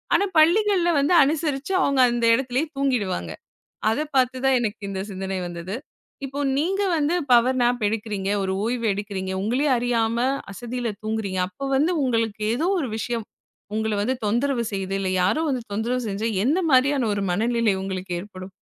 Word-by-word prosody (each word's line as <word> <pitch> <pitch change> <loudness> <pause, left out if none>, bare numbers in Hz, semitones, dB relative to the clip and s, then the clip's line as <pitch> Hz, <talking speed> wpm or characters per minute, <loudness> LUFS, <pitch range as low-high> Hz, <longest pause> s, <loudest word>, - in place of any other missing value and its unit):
ஆனா 400 - +3
பள்ளிகள்ல 360 +2 +4
வந்து 285 +6 +2
அனுசரிச்சு 295 +2 -1
அவுங்க 275 -2 +2
அந்த 240 -1 0
எடத்துலேயே 260 +4 -1
தூங்கிடுவாங்க. 205 - -1 0.6
அத 225 - 0 0.2
பாத்து 255 0 +3
தான் 265 -1 +4
எனக்கு 215 -2 -3
இந்த 190 -1 -3
சிந்தனை 190 0 -4
வந்தது. 175 +4 -5 0.5
இப்போ 275 +1 -7 0.2
நீங்க 380 +7 0
வந்து 305 +2 +1 0.2
பவர் 250 +2 +4
நாப் 240 -1 +1
எடுக்குறீங்க. 210 -2 -3
ஒரு 190 0 -1
ஓய்வு 235 0 -1
எடுக்குறீங்க. 195 -2 -4
உங்களையே 255 +8 +1
அறியாம 235 -1 0 0.3
அசதியில 240 +4 -4
தூங்குறீங்க. 215 -4 -2
அப்போ 195 +9 -8
வந்து 310 +6 +2
உங்களுக்கு 230 -4 0
ஏதோ 305 +8 0
ஒரு 275 - -2
விஷயம் 230 -1 -3 0.5
உங்கள 220 0 0
வந்து 245 +6 0
தொந்தரவு 240 +3 +1
செய்து, 195 -1 -3
இல்ல 195 -1 -1
யாரோ 190 +12 +2
வந்து 260 -4 -1
தொந்தரவு 235 +5 -1
செஞ்சா, 205 +2 -2 0.2
என்ன 295 +8 +2
மாரியான 265 -2 +3
ஒரு 200 - -2
மனநிலை 230 +3 +1
உங்களுக்கு 190 -1 -5
ஏற்படும்? 185 -1 -10
235 Hz, 160 wpm, -23 LUFS, 200-270 Hz, 0.6 s, பள்ளிகள்ல